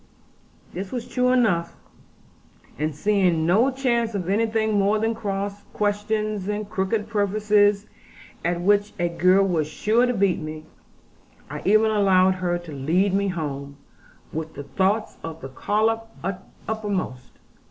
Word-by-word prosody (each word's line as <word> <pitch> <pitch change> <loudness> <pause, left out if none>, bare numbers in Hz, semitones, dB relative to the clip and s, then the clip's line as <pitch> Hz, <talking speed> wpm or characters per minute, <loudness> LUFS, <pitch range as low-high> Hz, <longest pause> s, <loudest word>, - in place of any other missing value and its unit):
This 190 +2 -5
was 245 -2 -4
true 250 0 +1
enough; 205 -10 +2 1.0
and 155 -1 -1
seeing 180 -3 +2
no 215 +10 +4
chance 240 -4 0
of 185 -2 -3
anything 220 +1 +1
more 205 +1 +3
than 225 +1 0
cross 200 -2 -4
questions 210 -1 -1
and 210 0 -2
crooked 210 +1 -1
purposes, 205 -1 +2 0.6
at 175 0 0
which 205 +2 +2
a 175 0 +1
girl 185 +3 +4
was 160 -5 0
sure 220 +10 +2
to 250 - +1
beat 195 -3 +2
me, 155 0 -7 0.9
I - - -5
even 215 +2 +4
allowed 190 -3 +4
her 175 -1 +1
to 175 -2 -10
lead 165 +8 +1
me 200 +1 +1
home, 140 -5 -4 0.6
with 160 0 -5
the 145 - -6
thoughts 200 +7 0
of 165 0 -6
the 135 - -7
collop 225 +9 0 0.6
uppermost. 200 - -3
200 Hz, 140 wpm, -24 LUFS, 175-215 Hz, 1.0 s, no